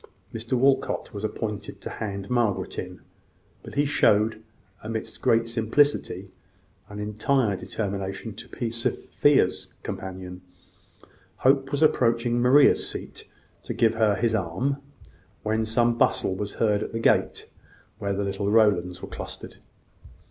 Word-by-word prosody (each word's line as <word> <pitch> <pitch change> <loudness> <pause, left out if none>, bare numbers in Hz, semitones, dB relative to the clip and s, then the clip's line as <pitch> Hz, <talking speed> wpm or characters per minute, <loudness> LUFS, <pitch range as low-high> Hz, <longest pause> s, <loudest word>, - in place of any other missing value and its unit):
Mr 115 +2 -4
Walcot 135 0 +1
was 100 0 -6
appointed 105 -1 -4
to - - -7
hand 100 -2 -5
Margaret 105 -6 0
in; 90 0 -7 0.6
but - - -11
he 145 +1 +3
showed, 110 -5 +3 0.4
amidst 110 0 -5
great 115 0 +3
simplicity, 115 -4 +1 0.6
an 105 - -8
entire 105 +2 +1
determination 100 -1 -4
to - - -8
be 115 -2 -3
Sophia's 115 0 +1 0.2
companion. 95 -1 -6 1.0
Hope 135 0 +4
was 145 +2 +1
approaching 120 -4 +2
Maria's 135 +4 +5
seat, - - -8 0.3
to - - -5
give 115 -1 +3
her 110 -2 +2
his 115 +1 +1
arm, 110 +8 -1 0.7
when 110 +1 0
some 120 +1 +1
bustle 95 - +2
was 100 +2 -4
heard 105 -2 +2
at - - -5
the 115 - -2
gate - - +1 0.5
where 100 0 -1
the 100 +1 -1
little 100 +1 -2
Rowlands 100 -5 +3
were - - -5
clustered. - - -8
110 Hz, 135 wpm, -25 LUFS, 100-120 Hz, 1.0 s, Maria's